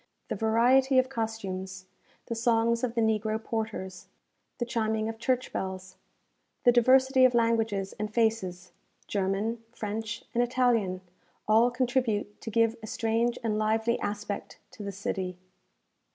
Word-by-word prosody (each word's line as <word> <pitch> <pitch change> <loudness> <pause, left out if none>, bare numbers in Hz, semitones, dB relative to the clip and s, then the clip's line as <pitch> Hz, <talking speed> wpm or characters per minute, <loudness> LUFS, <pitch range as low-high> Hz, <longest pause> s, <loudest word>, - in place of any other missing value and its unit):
The - - -1
variety 250 +4 +3
of 255 0 +4
costumes, 190 -6 -4 0.4
the - - -4
songs 230 0 +2
of 240 -2 -1
the 230 - +2
negro 220 0 +1
porters, 215 -5 -4 0.5
the 240 - -1
chiming 220 -2 -1
of 225 0 -5
church 255 +1 -1
bells, 190 0 -5 0.7
the 245 - +7
diversity 260 +2 +5
of 255 -1 +5
languages 225 -4 +1
and 210 0 -3
faces, 200 -6 0 0.3
German, 205 +4 -1
French, 220 0 -5
and 240 - +2
Italian, 240 -7 +1 0.5
all 225 +3 +5
contribute 245 -4 -1
to - - -5
give 230 +1 +2
a 215 - -8
strange 230 +2 0
and 215 -2 0
lively 220 +2 +1
aspect 205 0 -4
to - - -11
the 200 -1 -4
city. 185 -2 -4
225 Hz, 140 wpm, -28 LUFS, 205-235 Hz, 0.7 s, the